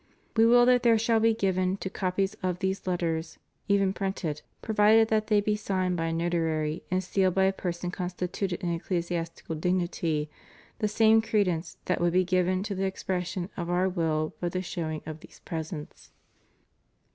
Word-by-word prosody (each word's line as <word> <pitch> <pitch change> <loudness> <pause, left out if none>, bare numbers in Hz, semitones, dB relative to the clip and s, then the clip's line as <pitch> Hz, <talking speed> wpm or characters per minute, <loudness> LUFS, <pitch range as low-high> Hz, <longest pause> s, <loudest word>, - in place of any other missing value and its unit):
We 225 0 +6
will 240 +1 +6
that 250 0 +5
there 230 -2 +5
shall 225 +1 +2
be 225 0 +3
given 185 -2 0
to 195 - -5
copies 190 0 -1
of 180 -2 -1
these 190 0 -2
Lettera, 170 -3 0 0.4
even 195 -1 +3
printed, 190 -7 -3 0.2
provided 220 +1 +4
that 215 -1 +1
they 210 -2 +4
be 210 +1 +1
signed 185 -3 -1
by 165 -1 -1
a - - -1
notary 165 -2 -1
and 185 +1 0
sealed 185 0 +1
by 190 - +4
a 190 0 +3
person 175 -1 -4
constituted 180 0 -3
in 175 -1 0
ecclesiastical 170 -1 -3
dignity, 165 -2 -1 0.5
the 210 - +1
same 220 +1 +5
credence 190 -7 0
that - - 0
would 175 0 +2
be 185 0 +3
given 185 +1 +1
to 205 - -3
the 195 0 -1
expression 185 -1 -3
of 170 -1 -4
Our 180 +1 +2
will 160 -4 -1
by 175 - -1
the 185 +1 -3
showing 160 -3 -4
of 155 0 -6
these - - -16
present*. 160 -2 -6
185 Hz, 175 wpm, -28 LUFS, 170-200 Hz, 0.5 s, We